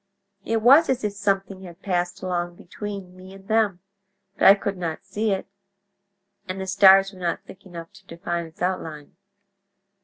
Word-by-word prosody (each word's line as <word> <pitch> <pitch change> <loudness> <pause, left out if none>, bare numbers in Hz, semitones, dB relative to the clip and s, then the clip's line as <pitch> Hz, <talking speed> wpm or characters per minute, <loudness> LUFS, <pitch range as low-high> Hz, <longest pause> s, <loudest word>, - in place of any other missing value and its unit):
It 225 +1 -1
was 280 +7 +7
as 260 -2 0
if 210 -1 -1
something 195 -2 -2
had 175 -1 -12
passed 180 -1 -2
along 175 -1 -2
between 195 0 -8
me 185 +1 -13
and 195 0 -16
them; 215 -5 +1 0.5
but - - +4
I 195 - +10
could 200 -1 -3
not 165 -3 -5
see 215 +1 -2
it, 195 -1 -1 1.0
and 185 +1 -5
the 190 - -4
stars 195 +1 +6
were 185 - -13
not 170 -2 -2
thick 190 +1 -14
enough 170 0 -10
to 195 -1 -19
define 170 0 -4
its 160 +2 -9
outline. 160 -5 -4
190 Hz, 175 wpm, -24 LUFS, 175-200 Hz, 1.0 s, I